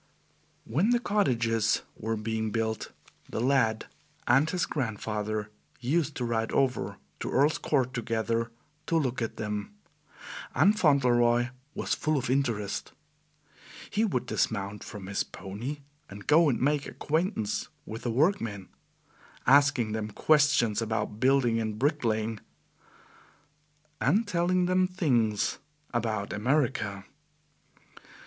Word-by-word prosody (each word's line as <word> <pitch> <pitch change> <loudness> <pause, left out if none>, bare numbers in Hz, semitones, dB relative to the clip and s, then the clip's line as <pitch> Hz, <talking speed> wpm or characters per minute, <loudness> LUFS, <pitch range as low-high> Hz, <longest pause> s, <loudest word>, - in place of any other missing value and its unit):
When 160 - +1
the 240 0 +4
cottages 115 - +1
were 110 +1 -2
being 110 0 -2
built, 110 0 -2 0.4
the - - -3
lad 115 -3 +2 0.4
and 135 +6 +4
his 180 -3 0
grandfather 110 -5 -3 0.3
used 145 +4 0
to 125 - -2
ride 115 -1 -1
over 130 -3 0 0.2
to - - -3
Earl's 145 +3 +3
Court 130 -4 0
together 115 -1 -1 0.4
to 165 - +2
look 130 -6 -1
at 115 - -3
them, 105 - -4 0.8
and 205 +2 +5
Fauntleroy 120 -6 +4 0.3
was - - -1
full 155 -1 0
of 130 -2 -1
interest. 115 -7 -1 1.0
He 215 - +1
would 175 - 0
dismount 100 +1 -1
from 105 -4 -8
his 100 +1 -1
pony 115 +10 -6 0.3
and 100 0 -10
go 160 +1 +5
and 125 - 0
make 145 +1 +1
acquaintance 155 - -1 0.2
with 110 +1 -7
the 120 - -2
workmen, 115 - 0 0.8
asking 140 -4 +4
them 110 0 -3
questions 140 -4 +3
about 110 -1 -2
building 130 -3 +3
and 110 -1 -2
bricklaying, 115 -6 0 1.6
and 215 +4 +2
telling 180 -1 +2
them 185 +1 +3
things 125 - +1 0.3
about 110 -4 -1
America. 110 -4 0
120 Hz, 120 wpm, -28 LUFS, 110-145 Hz, 1.6 s, and